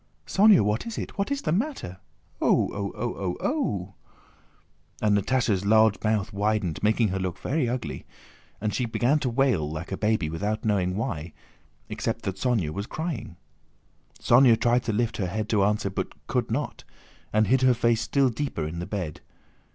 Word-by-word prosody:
"Sónya! 205 -1 +6
What 105 - 0
is 230 - -5
it? - - -5
What 200 - 0
is 280 -1 -2
the 155 - 0
matter?... 195 - -2 0.4
Oo... - - +3
Oo... 100 -2 -3
Oo...!" 100 - -1 1.1
And 105 -1 +3
Natásha's 105 -2 +1
large 110 0 +4
mouth 110 0 0
widened, 100 -5 0
making 110 +1 +2
her 95 +1 -2
look 95 -1 -3
quite 145 -2 0
ugly, 120 0 -4 0.5
and 105 0 -2
she 125 - 0
began 125 +6 +2
to 130 - -1
wail 115 - +1
like 80 +4 -6
a 95 - -2
baby 105 -6 +1
without 100 +8 -3
knowing 95 -4 +1
why, 90 - -3 0.5
except - - -3
that 95 -1 -3
Sónya 110 -12 0
was 100 +6 -5
crying. 155 - -5 0.8
Sónya 120 -2 +5
tried 120 +1 +3
to 115 - 0
lift 115 +2 -1
her 95 - -1
head 105 +4 -3
to 105 -3 +3
answer 105 -1 +1
but - - -5
could - - -1
not, - - -3 0.5
and 110 +1 +3
hid 130 +3 +3
her 130 -1 +5
face 115 -1 +2
still 135 +2 +2
deeper 115 - -3
in 80 +2 -5
the 90 - -5
bed. 90 -7 -4
110 Hz, 175 wpm, -26 LUFS, 95-125 Hz, 1.1 s, Sónya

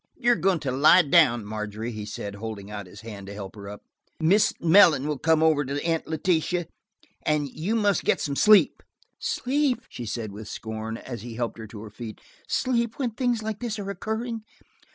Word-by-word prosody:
"You 245 -2 +3
are - - +5
going 180 0 +1
to 135 - -2
lie 150 +7 +6
down, 140 -8 +4
Margery," 105 +2 -4
he 105 -2 -6
said, 105 -1 -5
holding 105 -1 -7
out 100 -2 -6
his 95 +2 -12
hand 105 -4 -9
to 100 - -8
help 100 -1 -8
her 100 -1 -9
up. 105 - -10 0.4
"Mrs. 190 +6 +3
Mellon 165 -5 +6
will 150 -3 -2
come 160 -1 +3
over 155 -2 +4
to 140 +1 -3
Aunt 165 -1 0
Letitia, 170 +2 0 0.6
and 150 -1 +1
you 170 - -2
must 205 -3 +2
get - - +2
some 140 -2 -2
sleep." 210 +6 +5 0.4
"Sleep!" 260 -2 0
she 120 - -7
said 110 -1 -4
with 105 +1 -9
scorn, 110 +1 -5
as 120 -2 -7
he 115 0 -8
helped 115 -1 -3
her 110 - -7
to 105 0 -10
her 110 - -10
feet. 110 0 -8 0.3
"Sleep, 235 -3 0
when 255 -4 -1
things 240 -1 -1
like 215 -1 -4
this 235 -3 -3
are 200 -1 -4
occurring! 225 +4 -4
145 Hz, 200 wpm, -26 LUFS, -, 0.6 s, lie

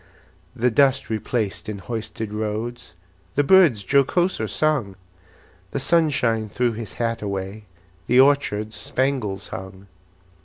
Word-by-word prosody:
The 125 0 +1
dust 135 +1 +3
replaced 110 -1 -2
in 105 - -4
hoisted 110 0 -5
roads, 110 -1 -4 0.4
The 145 - +3
birds 150 - +5
jocoser 140 - +2
sung; 140 -11 0 0.7
The 140 - -3
sunshine 130 -8 +1
threw 120 +4 0
his 110 -2 -7
hat 115 -1 -2
away, 100 +1 -4 0.4
The 125 - +4
orchards 120 -6 +3
spangles 105 -3 -2
hung. 95 0 -8
115 Hz, 115 wpm, -23 LUFS, 105-135 Hz, 0.7 s, birds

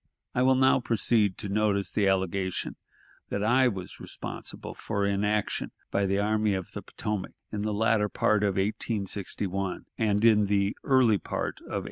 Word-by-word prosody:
I 125 - +1
will 130 +1 +5
now 130 0 +4
proceed 110 -4 +2
to 105 - -4
notice 100 -1 +1
the 100 -2 +2
allegation 95 -1 -1 0.5
that 100 - -2
I 125 +4 +4
was 95 -6 -5
responsible - - -6
for 100 0 -2
inaction 105 +1 0 0.2
by 100 0 +1
the 100 +1 +1
Army 105 0 +1
of 95 -2 -5
the - - -6
Potomac, 105 -3 -4 0.2
in 105 - -3
the 105 +1 -1
latter 105 0 +2
part 105 +1 +2
of 100 -2 +1
1861 100 -2 -2
and 105 -1 +2
in 105 -3 +5
the 100 0 +1
early 125 -6 +4
part - - -4
of - - -18
1862. - - -3
105 Hz, 165 wpm, -28 LUFS, 100-110 Hz, 0.5 s, will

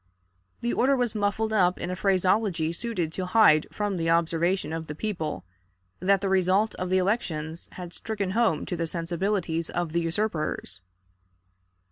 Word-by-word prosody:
The 240 - 0
order 270 +3 +3
was 245 -3 0
muffled 215 +1 0
up 180 -3 +3
in 175 - -3
a - - -2
phraseology 185 -3 +1
suited 175 -5 -2
to 185 -1 -3
hide 180 -7 +5
from 205 -2 -2
the 165 -1 0
observation 170 +1 +1
of 160 -1 -4
the 150 - -6
people 160 - -3 0.5
that 195 +1 +3
the 200 - 0
result 190 +3 +2
of 180 - -2
the 185 - +3
elections 170 -5 -2
had 175 -2 -8
stricken 205 -4 -3
home 220 -7 +1
to 180 - -3
the 165 -1 -2
sensibilities 170 0 -1
of 175 -2 -2
the 170 +1 +1
usurpers. 165 - -2
185 Hz, 160 wpm, -26 LUFS, 165-205 Hz, 0.5 s, hide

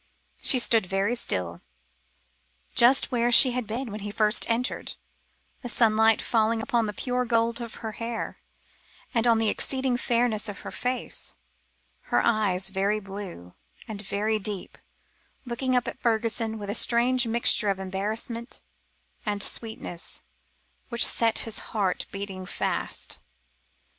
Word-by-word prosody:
She 265 - +5
stood 225 -5 +3
very 195 +4 0
still, 90 - -1 1.1
just 255 +4 +5
where 240 -1 +1
she 255 +2 +8
had 245 -2 -3
been 235 +2 -4
when 210 - -5
he 205 0 -5
first 210 +1 +2
entered, 235 +2 -2 0.7
the 245 - -5
sunlight 220 -1 +4
falling 225 0 +2
upon 230 0 0
the - - -2
pure 250 +3 -1
gold 230 0 +1
of 230 -2 -7
her 220 - -2
hair, 230 +1 -5 0.7
and 235 -1 +2
on 230 -1 +5
the 225 0 +1
exceeding 260 0 +2
fairness 235 -3 0
of 200 - -7
her - - -7
face; 250 0 -3 0.7
her - - +2
eyes 200 -5 +2
very 200 +2 0
blue, 195 - -9 0.3
and 210 -3 -6
very 215 +2 -1
deep, 200 -2 -5 0.7
looking 255 +1 -1
up 245 - +1
at - - -6
Fergusson 225 -1 0
with 205 -1 -5
a - - -2
strange 240 +2 +2
mixture 225 -2 +3
of 195 - 0
embarrassment 215 +5 -4 0.6
and 205 -2 -1
sweetness, 220 -6 -3 0.7
which 235 -1 +3
set 230 -1 +3
his 225 -1 -4
heart 195 -4 -2
beating 195 -2 -6
fast. - - -2
225 Hz, 140 wpm, -26 LUFS, 205-235 Hz, 1.1 s, she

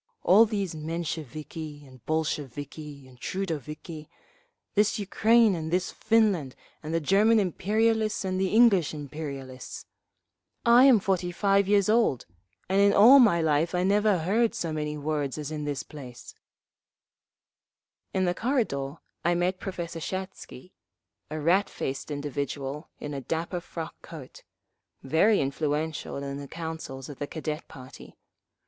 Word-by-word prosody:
All 215 +5 +6
these 200 -5 -2
Mensheviki 155 -1 -5
and 130 -3 -17
Bolsheviki 145 -2 -4
and 125 -1 -18
Trudoviki…. 155 -3 -5 0.7
This 210 0 +2
Ukraine 220 +2 +3
and 160 -2 -3
this 180 +2 0
Finland 210 - +1 0.3
and 155 - -6
the 165 - +1
German 210 +7 +4
imperialists 215 +3 +1
and 185 0 -1
the 190 - +2
English 200 -7 +4
imperialists. 140 -3 -7 0.8
I 240 +2 +7
am 255 -5 +7
forty 185 -2 -1
five 195 +2 +2
years 200 -1 +3
old, 215 - +2 0.4
and 195 +2 +2
in 200 0 +5
all 245 +7 +8
my 200 -10 +5
life 160 +3 +1
I 180 - +1
never 205 +1 +3
heard 215 +8 +1
so 165 -2 -3
many 150 -1 -3
words 145 -2 -2
as 150 0 -5
in 150 -1 -4
this 145 -3 -3
place…." 130 -5 -11 1.8
In 190 -1 +1
the 175 - +1
corridor 180 - -1 0.3
I 175 +1 +2
met 180 +2 0
Professor 170 -4 -5
Shatsky, 185 -3 -7 0.6
a 155 +1 -4
rat 180 +6 +2
faced 135 +3 -5
individual 145 0 -4
in 150 - -6
a 140 - -4
dapper 165 +6 -3
frock 165 -2 -7
coat, 150 -6 -11 0.6
very 165 +10 +3
influential 150 +3 -2
in 140 0 -5
the 140 0 -7
councils 160 -5 -6
of 145 - -10
the 145 - -3
Cadet 155 0 -5
party. 130 -3 -13
165 Hz, 140 wpm, -27 LUFS, 145-195 Hz, 1.8 s, all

